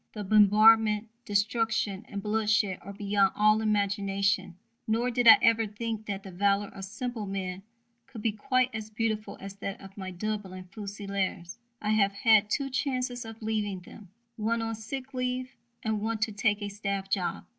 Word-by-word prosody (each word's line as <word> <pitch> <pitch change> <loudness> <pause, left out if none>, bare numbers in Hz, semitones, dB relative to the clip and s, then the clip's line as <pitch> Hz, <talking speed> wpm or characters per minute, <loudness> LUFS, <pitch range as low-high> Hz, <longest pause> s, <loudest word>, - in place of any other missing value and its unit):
The 210 - -5
bombardment, 215 +1 +5 0.2
destruction, 210 0 0
and 200 -1 -5
bloodshed 210 -2 +1
are 200 - -8
beyond 200 -1 +1
all 215 +1 +4
imagination, 200 -2 0 0.3
nor 235 +3 +1
did 245 0 +1
I - - +11
ever 225 -1 +4
think 220 +1 -5
that 195 -1 -4
the 195 - -9
valour 200 +2 +1
of 195 - -8
simple 225 +1 -5
men 190 -1 -4 0.5
could 220 -4 -9
be 225 - +2
quite 255 +4 +1
as 220 -1 -5
beautiful 220 -1 -2
as 195 0 -9
that 200 0 -5
of 195 0 -13
my 190 -2 -6
Dublin 190 0 -4
Fusiliers. 200 -4 -4 0.2
I 210 - +1
have 200 -2 +3
had 215 -2 +4
two 275 +2 -1
chances 255 -2 -2
of 225 0 -10
leaving 210 -4 -2
them 195 +1 -14 0.3
one 225 +1 0
on 225 0 -2
sick 255 +5 -6
leave 255 0 -3 0.3
and 220 -2 -1
one 225 +1 -1
to 215 +1 +1
take 210 0 0
a 205 - -3
staff 200 -1 -3
job. 190 -2 -2
210 Hz, 170 wpm, -28 LUFS, 200-225 Hz, 0.5 s, I